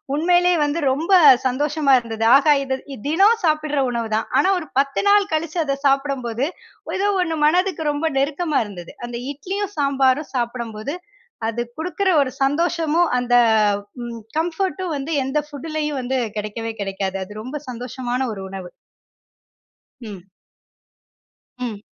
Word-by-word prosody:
உண்மையிலேயே, 350 Hz, +3 st, +3 dB
வந்து 290 Hz, +3 st, -1 dB
ரொம்ப 320 Hz, +8 st, -2 dB, 0.4 s
சந்தோஷமா 285 Hz, +2 st, +1 dB
இருந்தது. 225 Hz, -1 st, -3 dB
ஆகா 295 Hz, +1 st, +4 dB
இது 265 Hz, -1 st, -2 dB, 0.3 s
தினம் 400 Hz, +9 st, +4 dB
சாப்புடுற 305 Hz, -2 st, +1 dB
உணவுதான். 225 Hz, -2 st, -1 dB
ஆனா, 380 Hz, -, +4 dB
ஒரு 315 Hz, -, -8 dB
பத்து 275 Hz, 0 st, +1 dB
நாள் 405 Hz, 0 st, +4 dB
கழித்து 315 Hz, +2 st, -1 dB
அத 275 Hz, -1 st, -1 dB
சாப்புடும்போது 270 Hz, -2 st, 0 dB, 0.5 s
ஏதோ 400 Hz, +2 st, +1 dB
ஒண்ணு 325 Hz, -2 st, -3 dB
மனதுக்கு 360 Hz, 0 st, +1 dB
ரொம்ப 290 Hz, +3 st, -2 dB
நெருக்கமா 300 Hz, +3 st, 0 dB
இருந்தது. 180 Hz, -5 st, -10 dB
அந்த 240 Hz, 0 st, -6 dB, 0.2 s
இட்லியும், 390 Hz, +7 st, -4 dB
சாம்பாரும் 275 Hz, +1 st, +2 dB
சாப்புடும்போது 235 Hz, +2 st, -3 dB, 0.5 s
அது 230 Hz, +1 st, -2 dB, 0.2 s
குடுக்குற 365 Hz, +4 st, -1 dB
ஒரு 260 Hz, -2 st, -1 dB
சந்தோஷமும், 330 Hz, +3 st, +1 dB
அந்த 245 Hz, 0 st, +1 dB, 1.0 s
கம்ஃபர்ட்டும் 345 Hz, 0 st, -1 dB
வந்து 280 Hz, +4 st, -5 dB
எந்த 270 Hz, +3 st, 0 dB
ஃபுட்லேயும் 300 Hz, -1 st, -4 dB
வந்து 260 Hz, +1 st, -1 dB, 0.2 s
கிடைக்கவே 220 Hz, +2 st, -4 dB
கிடைக்காது. 195 Hz, -1 st, -3 dB
அது 210 Hz, +2 st, -9 dB
ரொம்ப 280 Hz, +4 st, -5 dB
சந்தோஷமான 250 Hz, +1 st, -3 dB
ஒரு 195 Hz, -, -7 dB
உணவு. 190 Hz, -2 st, -8 dB, 1.3 s
ம். 205 Hz, -6 st, -9 dB, 1.3 s
ம். 230 Hz, -5 st, -4 dB
280 Hz, 125 wpm, -21 LUFS, 240-325 Hz, 1.3 s, ஆகா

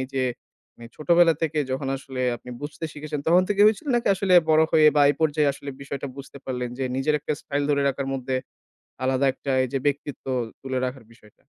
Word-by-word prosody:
এই 130 Hz, -, -3 dB
যে 130 Hz, -, +1 dB, 0.5 s
মানে 120 Hz, -, -11 dB
ছোটবেলা 170 Hz, +1 st, +4 dB
থেকে 155 Hz, -1 st, 0 dB
যখন 135 Hz, +1 st, -2 dB
আসলে 130 Hz, -1 st, -7 dB, 0.2 s
আপনি 125 Hz, -, -12 dB
বুঝতে 145 Hz, +2 st, -6 dB
শিখেছেন 150 Hz, 0 st, -5 dB
তখন 175 Hz, +3 st, +5 dB
থেকে 205 Hz, -1 st, 0 dB
হয়েছিল? 215 Hz, +5 st, +1 dB
নাকি 240 Hz, -2 st, +1 dB
আসলে 190 Hz, -1 st, +2 dB, 0.2 s
বড় 155 Hz, 0 st, +5 dB
হয়ে 155 Hz, -1 st, +6 dB
বা 145 Hz, -, +6 dB
এই -, -, -1 dB
পর্যায়ে 150 Hz, -2 st, +2 dB
আসলে 140 Hz, +1 st, -8 dB
বিষয়টা 140 Hz, 0 st, -5 dB
বুঝতে 140 Hz, 0 st, -10 dB
পারলেন? 125 Hz, -1 st, -3 dB
যে 135 Hz, -, -1 dB
নিজের 135 Hz, +3 st, +1 dB
একটা 150 Hz, -, -2 dB
স্টাইল 145 Hz, 0 st, -2 dB
ধরে 140 Hz, -1 st, +2 dB
রাখার 140 Hz, 0 st, -2 dB
মধ্যে 130 Hz, 0 st, -2 dB, 0.7 s
আলাদা 130 Hz, +1 st, +2 dB
একটা 135 Hz, -, -6 dB
এই -, -, -4 dB
যে 135 Hz, -, +1 dB
ব্যক্তিত্ব 145 Hz, 0 st, -2 dB, 0.4 s
তুলে 130 Hz, -1 st, -2 dB
রাখার 125 Hz, -1 st, -7 dB
বিষয়টা? 105 Hz, -2 st, -22 dB
140 Hz, 205 wpm, -24 LUFS, 130-155 Hz, 0.7 s, হয়ে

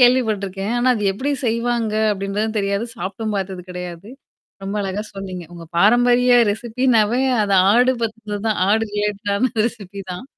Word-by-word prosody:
கேள்விப்பட்டுருக்கேன். 215 Hz, -5 st, +2 dB
ஆனா 255 Hz, +1 st, +3 dB
அது 215 Hz, -, -3 dB
எப்படி 260 Hz, +9 st, -3 dB, 0.2 s
செய்வாங்க? 230 Hz, -1 st, 0 dB, 0.2 s
அப்படின்றதும் 205 Hz, +2 st, -2 dB
தெரியாது. 200 Hz, +2 st, -1 dB
சாப்ட்டும் 205 Hz, +4 st, -4 dB
பார்த்ததும் 190 Hz, -2 st, -4 dB
கெடையாது. 180 Hz, +2 st, -7 dB, 0.5 s
ரொம்ப 195 Hz, +2 st, -4 dB
அழகா 195 Hz, +1 st, -3 dB
சொன்னீங்க. 185 Hz, -2 st, -6 dB
உங்க 170 Hz, -1 st, -9 dB
பாரம்பரிய 245 Hz, +5 st, +4 dB, 0.2 s
ரெசிபின்னாவே 235 Hz, +1 st, +1 dB, 0.2 s
அத 200 Hz, -, -1 dB, 0.2 s
ஆடு 250 Hz, +3 st, +4 dB
பத்தினது 220 Hz, -2 st, -4 dB
தான். 215 Hz, -, 0 dB
ஆடு 220 Hz, +2 st, +3 dB
ரிலேட்டடான 205 Hz, +3 st, -1 dB
ரெசிபி 200 Hz, -4 st, -7 dB
தான். 180 Hz, -, -7 dB
210 Hz, 140 wpm, -20 LUFS, 195-235 Hz, 0.5 s, பாரம்பரிய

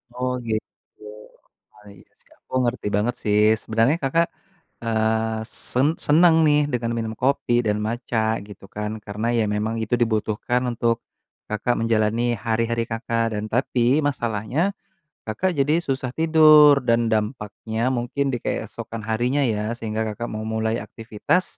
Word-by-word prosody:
Oh 125 Hz, 0 st, -1 dB
gitu, 110 Hz, -1 st, -6 dB, 0.7 s
baik, 105 Hz, -3 st, -16 dB, 0.2 s
sekarang -, -, -26 dB
aku -, -, -5 dB
ngerti 120 Hz, -3 st, -2 dB
banget 115 Hz, +4 st, 0 dB
sih 105 Hz, 0 st, +2 dB, 0.2 s
sebenernya, 115 Hz, +8 st, +1 dB
Kakak, 165 Hz, +6 st, +2 dB, 0.6 s
eee, 110 Hz, 0 st, 0 dB, 0.3 s
sen 130 Hz, +3 st, +3 dB, 0.2 s
senang 160 Hz, +2 st, +5 dB
nih 150 Hz, 0 st, +4 dB
dengan 115 Hz, -1 st, -1 dB
minum 110 Hz, -1 st, -3 dB
kopi 135 Hz, -2 st, +1 dB
dan 105 Hz, 0 st, +1 dB
matcha 115 Hz, 0 st, -2 dB, 0.3 s
gitu 100 Hz, -1 st, -13 dB
kan. 105 Hz, 0 st, -4 dB
Karena 105 Hz, +2 st, -4 dB
ya 110 Hz, -, +2 dB
memang 110 Hz, +2 st, -1 dB
itu 110 Hz, +2 st, -1 dB
dibutuhkan 110 Hz, +2 st, 0 dB
untuk, 115 Hz, 0 st, 0 dB, 0.5 s
Kakak, 110 Hz, +3 st, -1 dB
menjalani 115 Hz, +1 st, +1 dB
hari-hari, 115 Hz, +1 st, -1 dB
Kakak 115 Hz, 0 st, -1 dB
dan 105 Hz, +1 st, -3 dB
tapi 125 Hz, +3 st, +2 dB
masalahnya, 115 Hz, +1 st, -2 dB, 0.6 s
Kakak, 180 Hz, +13 st, -1 dB
jadi 150 Hz, +4 st, +3 dB
susah 130 Hz, -2 st, -2 dB
tidur 155 Hz, -3 st, +7 dB
dan 115 Hz, 0 st, +3 dB
dampaknya 110 Hz, 0 st, -3 dB, 0.2 s
mungkin 120 Hz, +4 st, -2 dB
di -, -, 0 dB
keesokan 115 Hz, -1 st, -5 dB
harinya 120 Hz, +6 st, +1 dB
ya, 105 Hz, +1 st, -2 dB
sehingga, 110 Hz, 0 st, -3 dB
Kakak 120 Hz, +3 st, -5 dB
mau 110 Hz, -, -4 dB
mulai 110 Hz, +1 st, 0 dB
aktivitas, 115 Hz, -, -1 dB
115 Hz, 140 wpm, -23 LUFS, 110-130 Hz, 0.7 s, tidur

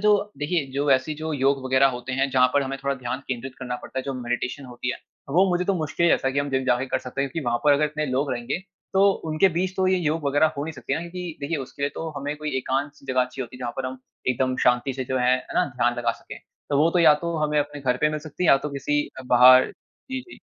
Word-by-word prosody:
जो 210 Hz, 0 st, +2 dB
देखिये, 150 Hz, +2 st, 0 dB
जो 140 Hz, +1 st, 0 dB
ऐसी 135 Hz, +3 st, +2 dB
जो 155 Hz, +1 st, -4 dB
योग 135 Hz, -1 st, +1 dB
वगैरह 130 Hz, +1 st, +4 dB
होते 125 Hz, +2 st, -6 dB
है, 135 Hz, +1 st, +1 dB
जहाँ 125 Hz, -1 st, +4 dB
पर 145 Hz, -, +4 dB
हमें 135 Hz, 0 st, -3 dB
थोड़ा 140 Hz, 0 st, +1 dB
ध्यान 130 Hz, +1 st, -4 dB
केंद्रित 130 Hz, +1 st, -4 dB
करना 125 Hz, -1 st, -4 dB
पड़ता 130 Hz, -, -6 dB
है, -, -, -2 dB
जो 135 Hz, 0 st, -4 dB
मेडिटेशन 125 Hz, +2 st, -3 dB
होती 125 Hz, 0 st, -4 dB
है, -, -, -8 dB, 0.3 s
वो 185 Hz, +5 st, +4 dB
मुझे 180 Hz, 0 st, +1 dB
तो 195 Hz, +1 st, +1 dB
मुश्किल 160 Hz, +1 st, 0 dB
ही -, -, +5 dB
ऐसा 135 Hz, -, +2 dB
है 135 Hz, -, -2 dB
कि -, -, +1 dB
हम 140 Hz, 0 st, -3 dB
जिम 130 Hz, 0 st, 0 dB
जाके 130 Hz, +1 st, +1 dB
कर -, -, 0 dB
सकते 130 Hz, +2 st, -6 dB
हैं 140 Hz, -1 st, -1 dB
क्योंकि 160 Hz, -2 st, -4 dB
वहाँ 120 Hz, 0 st, +1 dB
पर 145 Hz, -, +6 dB
अगर 145 Hz, +2 st, +3 dB
इतने 150 Hz, 0 st, -2 dB
लोग 130 Hz, +2 st, 0 dB
रहेंगे, 120 Hz, +7 st, -3 dB, 0.3 s
तो 195 Hz, +1 st, +5 dB, 0.2 s
उनके 155 Hz, +5 st, +4 dB
बीच 185 Hz, +2 st, -2 dB
तो 190 Hz, -1 st, +2 dB
ये 185 Hz, 0 st, +3 dB
योग 160 Hz, -2 st, -1 dB
वगैरह 145 Hz, +3 st, +4 dB
हो 140 Hz, -, -2 dB
नहीं 160 Hz, -, -5 dB
सकती 140 Hz, -, -3 dB
ना, 160 Hz, -, -2 dB
क्योंकि 170 Hz, -1 st, -6 dB
देखिए, 150 Hz, +3 st, -2 dB
उसके 135 Hz, +1 st, -7 dB
लिए 140 Hz, -, +2 dB
तो 165 Hz, -, -4 dB
हमें 145 Hz, +2 st, -3 dB
कोई 150 Hz, 0 st, -4 dB
एकांत-सी 135 Hz, +2 st, -3 dB
जगह 130 Hz, -1 st, +2 dB
चाहिए 130 Hz, +1 st, -6 dB
होती 120 Hz, -, -12 dB
है, -, -, -13 dB
जहाँ 120 Hz, -1 st, -4 dB
पर 130 Hz, -1 st, -2 dB
हम 130 Hz, 0 st, -6 dB, 0.3 s
एकदम 130 Hz, 0 st, +1 dB
शांति 125 Hz, +2 st, +3 dB
से 130 Hz, 0 st, -4 dB
जो 130 Hz, +1 st, -1 dB
है, 125 Hz, +1 st, +4 dB
है 130 Hz, -, -9 dB
ना, -, -, +3 dB
ध्यान 120 Hz, 0 st, +2 dB
लगा 120 Hz, -1 st, +1 dB
सकें। -, -, -11 dB, 0.3 s
तो 140 Hz, -, +2 dB
वो 155 Hz, +3 st, +5 dB
तो 175 Hz, -, +1 dB
या 160 Hz, -3 st, +7 dB
तो 170 Hz, -1 st, -2 dB
हमें 150 Hz, -1 st, +1 dB
अपने 145 Hz, 0 st, -2 dB
घर 125 Hz, -2 st, +1 dB
पे 150 Hz, -, +4 dB
मिल 150 Hz, -, -2 dB
सकती 155 Hz, +3 st, -5 dB
है -, -, +3 dB
या 135 Hz, -, +8 dB
तो 150 Hz, -, -2 dB
किसी 145 Hz, +1 st, 0 dB, 0.2 s
अ, -, -, -7 dB
बाहर 125 Hz, +1 st, +7 dB, 0.4 s
जी, 260 Hz, 0 st, -2 dB
जी। 360 Hz, -, -14 dB
140 Hz, 285 wpm, -24 LUFS, 130-155 Hz, 0.4 s, या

